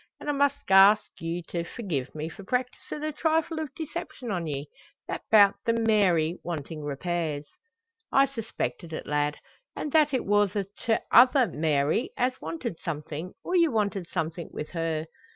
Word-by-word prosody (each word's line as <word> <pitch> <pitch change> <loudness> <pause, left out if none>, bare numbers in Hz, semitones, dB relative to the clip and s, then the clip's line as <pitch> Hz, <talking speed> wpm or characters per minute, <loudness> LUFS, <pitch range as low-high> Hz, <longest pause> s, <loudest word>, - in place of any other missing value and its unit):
An' - - -9
I - - +4
must 285 -5 0
ask 195 +2 +7
you 165 +1 -3
to 170 -1 -2
forgie 170 - -3
me 155 +1 -3
for 180 +4 -10
practisin' 250 +6 -3
a 310 - -1
trifle 320 +1 0
o' 315 - -2
deception 315 -6 -5
on 175 -4 -2
ye 145 -1 -4 0.4
that - - -4
'bout 205 -3 +7
the 230 - +2
Mary 195 -8 +2
wantin' 155 -2 -5
repairs." 150 0 -2 0.7
"I 275 - +6
suspected 225 -9 -5
it, - - -5
lad; 150 0 0 0.4
an' 300 - -4
that 305 -2 +4
it 260 - -1
wor 205 +1 +4
the 200 0 -2 0.5
tother 255 +2 +7
Mary 155 - +1
as 255 +1 0
wanted 235 - -5
something, 155 +2 -5
or 365 - -2
you 335 -2 +5
wanted 200 -5 -1
something 165 0 -3
wi' - - -4
her. 165 -2 -1
195 Hz, 165 wpm, -27 LUFS, 160-255 Hz, 0.7 s, ask